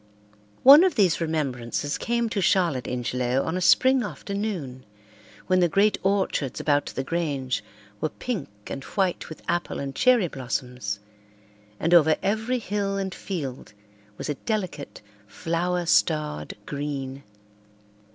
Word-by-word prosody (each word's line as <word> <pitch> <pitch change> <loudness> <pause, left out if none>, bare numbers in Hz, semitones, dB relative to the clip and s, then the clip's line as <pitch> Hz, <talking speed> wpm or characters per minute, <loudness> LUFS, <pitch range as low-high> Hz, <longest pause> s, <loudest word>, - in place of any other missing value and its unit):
One 285 +6 +10
of 375 - +2
these 185 -6 +3
remembrances 145 -3 -2
came 235 0 0
to 205 -2 -1
Charlotte 170 -8 +2
Ingelow 125 +1 -1
on 160 - -2
a 185 - -1
spring 260 +7 +5
afternoon 195 - -4 0.6
when 185 0 +3
the 175 -1 +3
great 200 +4 +3
orchards 190 -9 0
about 145 -1 +1
the 135 - -4
Grange 135 -7 -2 0.4
were 155 - -1
pink 215 - -4 0.2
and 135 - -6
white 190 +1 -1
with 160 - -10
apple 175 - -1
and 135 -1 -4
cherry 250 -7 +4
blossoms, 125 -6 -4 0.8
and 165 +2 +1
over 160 -2 +6
every 220 +5 0
hill 200 -3 -2
and 190 -1 -3
field 140 - -6 0.4
was - - -5
a 150 - 0
delicate, 185 - -4 0.2
flower 175 - -1
starred 150 - +1
green. 140 -2 -4
165 Hz, 130 wpm, -25 LUFS, 135-195 Hz, 0.8 s, One